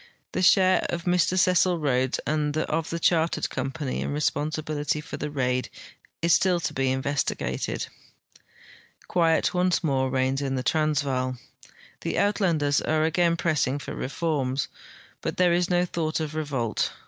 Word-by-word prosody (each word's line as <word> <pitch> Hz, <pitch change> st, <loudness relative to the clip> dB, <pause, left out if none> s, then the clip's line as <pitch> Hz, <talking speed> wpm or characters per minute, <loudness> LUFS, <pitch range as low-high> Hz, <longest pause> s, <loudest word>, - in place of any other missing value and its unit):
The -, -, -2 dB
share 185 Hz, 0 st, +5 dB
of 170 Hz, 0 st, -3 dB
Mr 180 Hz, +1 st, +2 dB
Cecil 180 Hz, -1 st, +3 dB
Rhodes 130 Hz, -4 st, 0 dB
and 150 Hz, 0 st, 0 dB
of 160 Hz, 0 st, -1 dB
the 170 Hz, -, -2 dB
Chartered 165 Hz, -1 st, +1 dB
Company 135 Hz, +1 st, -3 dB
in -, -, -2 dB
responsibility 150 Hz, 0 st, -1 dB
for 150 Hz, -, -7 dB
the 150 Hz, -, -4 dB
raid 125 Hz, -3 st, -1 dB, 0.5 s
is 170 Hz, 0 st, +4 dB
still 180 Hz, -2 st, +3 dB
to -, -, -2 dB
be 135 Hz, -1 st, 0 dB
investigated. 135 Hz, +2 st, -2 dB, 1.2 s
Quiet 165 Hz, -2 st, +2 dB
once 180 Hz, 0 st, +1 dB
more 135 Hz, -4 st, +1 dB
reigns 130 Hz, +1 st, 0 dB
in 135 Hz, -1 st, -1 dB
the 130 Hz, -, -2 dB
Transvaal. 135 Hz, -4 st, 0 dB, 0.6 s
The -, -, -3 dB
Uitlanders 165 Hz, -8 st, +2 dB
are 155 Hz, 0 st, +1 dB
again 170 Hz, +1 st, +2 dB
pressing 150 Hz, -5 st, +1 dB
for 145 Hz, -, -7 dB
reforms, 135 Hz, -2 st, -2 dB, 0.5 s
but -, -, -3 dB
there 180 Hz, -1 st, +4 dB
is 175 Hz, +1 st, +1 dB
no 180 Hz, 0 st, +2 dB
thought 160 Hz, -2 st, -2 dB
of 155 Hz, -1 st, -3 dB
revolt. 140 Hz, -7 st, -1 dB
155 Hz, 150 wpm, -26 LUFS, 135-170 Hz, 1.2 s, share